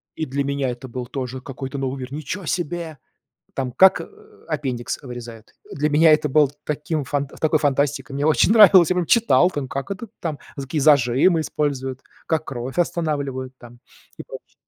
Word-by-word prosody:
и 160 - -3
для 140 0 -2
меня 140 -1 -1
это 125 +2 -7
был 125 0 -6
тоже 130 0 -5
какой-то 135 +1 -7
новый 135 0 -3
мир. 130 +1 -7
Ниче 155 +6 -5
себе! 170 -2 -3 0.6
Там 130 -2 -2
как, 190 +9 +5
э, - - -7 0.4
аппендикс 135 -6 -3
вырезают. 120 -3 -10 0.2
Для 150 +2 -1
меня 160 +2 +5
это 150 -2 +2
было 150 -1 +4
таким 150 0 -3
фан 145 +2 -2
такой 155 +3 0
фантастикой, 140 -1 0
мне 140 +1 -2
очень 155 +4 +3
нравилось, 195 -6 +8
я 185 - 0
прям 180 - +1
читал 230 -5 +4
там, 145 -6 -4
как 140 +7 -5
это 200 +4 -6
там 155 -4 -4 0.2
за 140 - -5
какие 150 +2 -2
зажимы 145 +4 +4
используют, 135 -4 -3 0.3
как 160 -1 -1
кровь 130 +3 -6
останавливают 140 -7 -2
там. 120 0 -15 0.4
И - - -8
прочее. - - -12
140 Hz, 180 wpm, -22 LUFS, 130-155 Hz, 0.6 s, нравилось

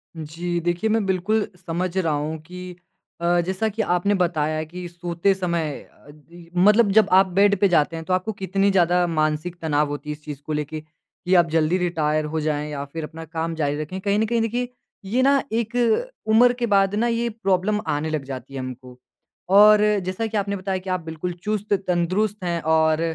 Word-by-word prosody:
जी, 165 +2 -4
देखिए 175 +5 -1
मैं 220 -1 +1
बिल्कुल 195 +3 0 0.2
समझ 180 +2 -2
रहा 165 -5 +1
हूँ 150 +2 -2
कि 180 +2 -9 0.5
अ, 175 +1 +2
जैसा 190 +5 -1
कि 220 +2 -3
आपने 180 0 +1
बताया 155 -4 0
कि 175 +3 -8
सोते 175 +2 0
समय 170 -5 -1
अ, - - -21
दी 165 +3 -16
मतलब 210 +3 +5
जब 215 0 +5
आप 190 +1 +6
बेड 200 0 +5
पे 200 - +5
जाते 165 -3 +2
हैं 160 0 -6
तो 185 - -1
आपको 185 +4 0
कितनी 195 +1 +1
ज़्यादा 180 -1 +3
मानसिक 155 +1 -1
तनाव 150 -2 +1
होती 145 +1 -6
है - - -1
इस 150 - -24
चीज 150 -2 -6
को 150 +2 -6
लेके, 150 +1 -3
कि 160 +4 -7
आप 170 -2 +4
जल्दी 160 +2 +2
रिटायर 155 -4 0
हो 155 +1 -2
जाएँ 150 -1 -2
या 140 -1 -4
फिर 160 +3 -7
अपना 160 +1 -8
काम 165 +1 -3
ज़ारी 145 -2 -1
रखें, 185 +5 -5
कहीं 200 +1 +1
न 220 - +2
कहीं 230 +1 0
देखिए, 240 +2 -1 0.4
ये 230 +7 0
ना 275 +1 +4
एक 230 +1 -2 0.5
उम्र 240 +3 +5
के 240 - +1
बाद 195 0 +3
ना 230 +3 +1
ये 235 0 0
प्रॉब्लम 210 -1 0
आने 150 +2 -1
लग 155 -3 -2
जाती 130 0 -8
है 135 - -4
हमको। 130 -1 -8 0.5
और 210 +2 +7 0.2
जैसा 185 +5 -2
कि 220 0 -3
आपने 200 0 -1
बताया 190 0 -2
कि 185 +1 -8
आप 185 0 0
बिल्कुल 160 +2 -5
चुस्त-तंदुरुस्त 200 -1 -1
हैं 170 -1 -1
और 160 0 +2
175 Hz, 200 wpm, -23 LUFS, 155-200 Hz, 0.5 s, और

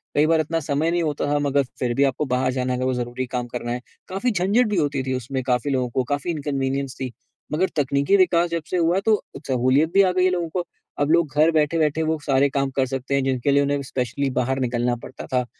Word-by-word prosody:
कई 150 - +4
बार 165 0 +3
इतना 165 +2 -1
समय 150 +1 0
नहीं 175 0 +1
होता 150 -2 -1
था 145 0 +1
मगर 140 -1 +2 0.2
फिर 125 -2 0
भी 140 - +3
आपको 140 +2 0
बाहर 130 0 +1
जाना 125 0 -1
है - - -1
अगर 130 - -1
वो 130 - +1
ज़रूरी 125 +1 -3
काम 125 -1 -3
करना 120 0 -5
है, 120 +1 -3 0.3
काफ़ी 195 +7 -1
झंझट 205 +5 +2
भी 210 - 0
होती 145 -4 0
थी 130 0 -2
उसमें। 130 +2 -3
काफ़ी 125 +2 0
लोगों 130 -2 0
को 130 +2 0
काफ़ी 145 +4 -1
इनकन्वीनियंस 140 -3 -2
थी। 130 -2 -3 0.4
मगर 185 +5 +1
तकनीकी 140 +5 +2
विकास 175 -2 +3
जब 170 -1 -2
से 185 - 0
हुआ, 170 +2 +2
तो 215 +1 +1 0.2
सहूलियत 130 +5 +2
भी 195 - +6
आ 185 -2 +3
गई 180 0 +1
है - - +4
लोगों 175 -2 -1
को। 175 +1 -3 0.3
अब 145 +1 +2
लोग 170 -2 +3
घर 155 +2 +5
बैठे-बैठे 155 0 +1
वो 160 - 0
सारे 140 0 +3
काम 140 0 0
कर 135 - +2
सकते 135 +1 -3
हैं, 140 - +1
जिनके 135 +1 0
लिए 140 0 +4
उन्हें 140 0 0
स्पेशली 130 +1 -2
बाहर 130 +2 0
निकलना 120 -1 0
पड़ता 130 - -9
था। 125 -1 +2
140 Hz, 245 wpm, -23 LUFS, 130-165 Hz, 0.4 s, भी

